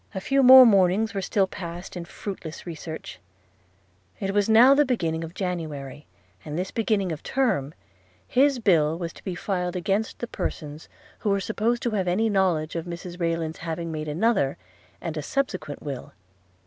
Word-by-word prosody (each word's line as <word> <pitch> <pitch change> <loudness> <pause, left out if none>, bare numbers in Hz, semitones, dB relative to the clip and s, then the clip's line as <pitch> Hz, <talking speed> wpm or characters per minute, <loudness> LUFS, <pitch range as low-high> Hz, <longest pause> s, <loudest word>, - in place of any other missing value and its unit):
A - - -1
few 275 +8 +2
more 260 0 +10
mornings 200 +1 +3
were 195 - -2
still 195 +1 +1
passed 175 -1 -8
in 175 -1 -5
fruitless 170 -3 -7
research. 160 -1 -7 1.0
It 195 - -2
was 205 +1 +2
now 235 +5 +8
the 290 +1 +5
beginning 170 - -1
of 165 +2 -8
January; 155 -7 -5 0.4
and 150 +1 -5
this 185 +2 -3
beginning 210 -5 0
of 155 - -5
Term 195 - 0 0.5
his 275 +1 +3
bill 165 -8 +3
was 170 -1 -5
to - - -15
be 185 -3 -4
filed 180 -1 -2
against 195 +4 -1
the - - -4
persons 150 -8 -5 0.3
who 215 - -1
were 200 0 +2
supposed 230 +5 -1
to 235 - 0
have 195 -4 -1
any 215 +5 +1
knowledge 175 -6 +1
of 165 0 -3
Mrs 175 +1 -7
Rayland's 165 -2 -2
having 165 0 -4
made 155 -1 -4
another, 155 - +1 0.4
and 160 -2 -5
a - - -1
subsequent 185 - -3
will. 140 -4 -6
180 Hz, 175 wpm, -25 LUFS, 160-215 Hz, 1.0 s, more